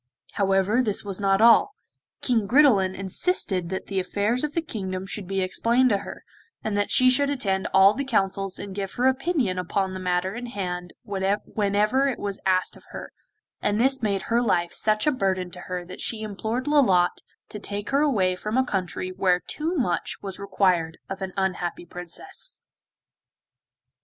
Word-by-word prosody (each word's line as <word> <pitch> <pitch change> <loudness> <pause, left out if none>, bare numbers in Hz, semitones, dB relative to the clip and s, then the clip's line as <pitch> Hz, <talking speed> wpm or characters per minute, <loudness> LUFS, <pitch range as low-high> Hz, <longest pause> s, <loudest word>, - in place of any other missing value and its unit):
However, 195 +4 +2
this 210 -5 -1
was 195 -1 -3
not 195 0 +2
all, 235 - +6 0.5
King 225 -5 +1
Gridelin 210 -7 +4
insisted 190 - 0
that 190 0 -4
the 195 -1 -2
affairs 205 +7 0
of 300 -1 -3
the 335 - +2
kingdom 190 - -4
should 195 -1 -4
be 195 0 -1
explained 235 +7 +2
to 200 - +2
her, - - -9 0.4
and 215 -2 -2
that 205 0 0
she 255 - +5
should 280 +3 +4
attend 195 -9 -1
all 190 +2 +6
the 280 - -3
councils 195 -6 0
and 200 -1 -7
give 195 -1 -4
her 250 - 0
opinion 260 - +1
upon 190 +2 -1
the 185 - -5
matter 180 +1 -1
in 245 +2 -6
hand 180 -5 -5
whenever 205 +5 0
it 265 - -1
was 200 -1 -4
asked 185 -1 +1
of - - -17
her, - - -8 0.5
and 205 +1 0
this 265 +2 +3
made 200 -3 0
her 235 +1 +1
life 175 -7 +1
such 215 -1 +1
a 300 - +4
burden 190 -7 -1
to 180 - -9
her 180 0 -5
that 180 - -9
she 225 -2 -2
implored 220 +4 -3
Lolotte 195 -13 +3 0.3
to 210 - -7
take 205 0 -4
her 280 +1 +3
away 200 -11 +2
from 215 +5 -3
a 260 - +3
country 185 -3 -3
where 185 -1 +2
too 325 +4 -2
much 240 - -1
was 195 -2 -6
required 185 -5 +1
of 195 0 -5
an 190 -1 -3
unhappy 180 -2 -2
Princess. 180 - -6
200 Hz, 180 wpm, -25 LUFS, 185-240 Hz, 0.5 s, all